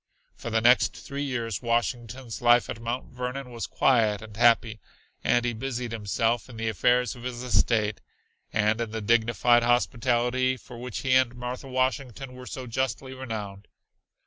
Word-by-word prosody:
For - - -6
the 115 0 +1
next 120 +2 +4
three 140 0 -6
years 120 -6 -2
Washington's 120 0 -2
life 120 0 +4
at 115 - -7
Mount 120 +2 -4
Vernon 125 +1 -5
was 115 -1 -4
quiet 110 -5 +2
and 110 -1 -11
happy, 115 -1 +3 0.4
and 120 0 +2
he 120 - 0
busied 125 0 -4
himself 115 +2 -1
in 120 - -10
the 115 0 -1
affairs 120 +5 +2
of 120 - -12
his 125 0 -5
estate 110 -4 +1 0.5
and 110 +2 +1
in 115 - -2
the 110 +1 -4
dignified 120 +2 +3
hospitality 120 +1 +1
for 120 0 -12
which 125 -1 -5
he 130 -1 +1
and 130 -1 +3
Martha 125 +2 -5
Washington 130 0 -2
were 125 0 -10
so 130 - -6
justly 130 +2 -2
renowned. 110 -6 -6
120 Hz, 165 wpm, -27 LUFS, 115-125 Hz, 0.5 s, next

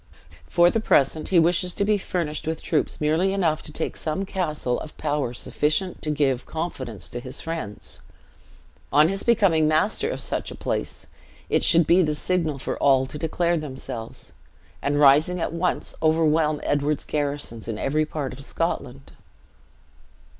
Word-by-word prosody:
For 175 0 +4
the 225 - +1
present, 155 -6 +2
he 185 - +2
wishes 175 +2 +3
to 200 - +1
be 210 0 +2
furnished 160 -5 -3
with 160 -1 -3
troops 155 - 0
merely 160 +6 +1
enough 165 -6 +1
to - - -6
take 160 - -3
some 160 +5 -3
castle, 155 -10 -2
of 155 - -10
power 145 -5 -1
sufficient 155 +8 -1
to 155 - -2
give 140 -4 0
confidence 130 - -4
to 120 - -5
his 130 +2 -6
friends. 160 -11 -6 0.9
On 150 +2 +5
his 195 +1 -2
becoming 195 -10 +3
master 160 - +1
of - - -4
such - - -2
a - - -8
place, - - -4 0.5
it - - +2
should 170 -1 +5
be 175 +4 +5
the 150 -3 +1
signal 160 -2 0
for 135 - -4
all 135 -2 +4
to 150 +3 -7
declare 170 +2 0
themselves; 130 -6 -6 0.5
and, 145 +1 0
rising 150 +5 +5
at 165 - -2
once, 175 +2 -1
overwhelm 155 -1 +2
Edward's 145 0 0
garrisons 145 -6 -3
in 115 -2 -3
every 150 +6 0
part 145 -4 -4
of 140 +2 -8
Scotland. 140 -4 -4
155 Hz, 160 wpm, -24 LUFS, 140-170 Hz, 0.9 s, On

